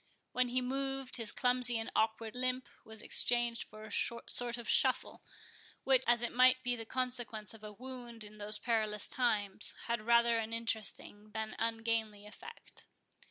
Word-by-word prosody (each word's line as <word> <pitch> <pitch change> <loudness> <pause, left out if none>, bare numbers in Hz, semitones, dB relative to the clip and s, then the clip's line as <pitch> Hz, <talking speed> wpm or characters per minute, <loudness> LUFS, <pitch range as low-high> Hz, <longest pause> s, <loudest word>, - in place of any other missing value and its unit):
When 255 0 +2
he 250 +1 0
moved, 270 0 -1
his 230 -3 +1
clumsy 250 -1 +2
and 225 - -4
awkward 220 0 0
limp 255 0 -1 0.2
was 220 -1 -10
exchanged 240 -1 +3
for 215 0 -12
a 215 - -10
sort 235 +2 -1
of 235 - -8
shuffle, - - +1 0.6
which, 265 -1 +4
as 240 0 +3
it 240 - -2
might 255 +1 +5
be 245 0 0
the 225 -2 -7
consequence 245 -4 -3
of 220 -1 -14
a 210 - -7
wound 240 -1 -8
in 210 0 -12
those 210 +1 +1
perilous 215 -3 0
times, 210 -5 +1
had 235 -1 -1
rather 235 +1 +4
an 225 0 -4
interesting 220 -2 -3
than 220 0 -3
an - - -9 0.2
ungainly 225 -2 -2
effect. 465 - -12
235 Hz, 165 wpm, -34 LUFS, 220-250 Hz, 0.6 s, might